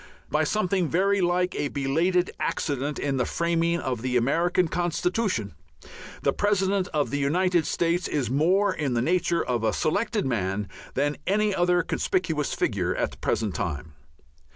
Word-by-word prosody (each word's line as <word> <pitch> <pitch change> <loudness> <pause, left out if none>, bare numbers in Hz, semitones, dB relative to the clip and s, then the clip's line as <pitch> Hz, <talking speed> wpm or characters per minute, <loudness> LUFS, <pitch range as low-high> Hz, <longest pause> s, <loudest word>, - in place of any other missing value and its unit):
By - - +2
something 195 -4 0
very 195 +3 +2
like 180 +1 +1
a 145 - -1
belated 165 +7 +1
accident 145 0 -2
in 140 -2 -1
the 125 - +1
framing 170 0 0
of 125 -7 -3
the 125 0 0
American 170 +8 +2
constitution, 175 - -1 0.7
the - - +2
President 200 -2 +1
of 150 -6 -1
the 145 - -1
United 175 +3 +2
States 170 +1 0
is 140 -5 -1
more 180 - +2
in 140 -7 -2
the 120 - +2
nature 170 +2 +1
of 120 -3 -1
a 110 - +2
selected 205 +6 0
man 105 -5 -1 0.3
than 145 +2 0
any 210 +1 +2
other 175 -1 +2
conspicuous 160 -5 -1
figure - - 0
at - - -1
the - - -13
present 105 -3 -1
time. 75 -2 -4
170 Hz, 155 wpm, -26 LUFS, 135-185 Hz, 0.7 s, By